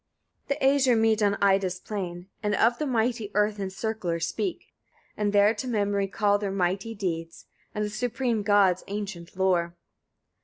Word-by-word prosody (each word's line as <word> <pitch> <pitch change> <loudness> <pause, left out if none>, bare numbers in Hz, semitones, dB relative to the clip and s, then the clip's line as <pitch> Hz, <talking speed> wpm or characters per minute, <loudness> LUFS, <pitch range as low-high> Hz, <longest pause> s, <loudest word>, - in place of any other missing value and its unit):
58. 280 - -1
The - - -1 0.3
Æsir 235 - +4
meet 220 -1 +3
on 200 -1 +2
Ida's 190 -2 +2
plain, 180 -3 -5
and 210 -1 0
of 235 +4 +3
the 305 - -1
mighty 230 -3 0
earth 210 0 +1
encircler 195 -2 -3
speak, 345 - -3 0.4
and 210 -1 0
there 205 +1 +5
to 245 +4 -5
memory 205 -4 0
call 205 +1 +1
their 205 -1 -2
mighty 195 +4 -1
deeds, 165 -5 -4 0.3
and 210 0 0
the - - -3
supreme 240 0 -1
god's 200 -3 +3
ancient 195 -4 -6
lore. 175 -3 +1
205 Hz, 160 wpm, -26 LUFS, 190-220 Hz, 0.4 s, there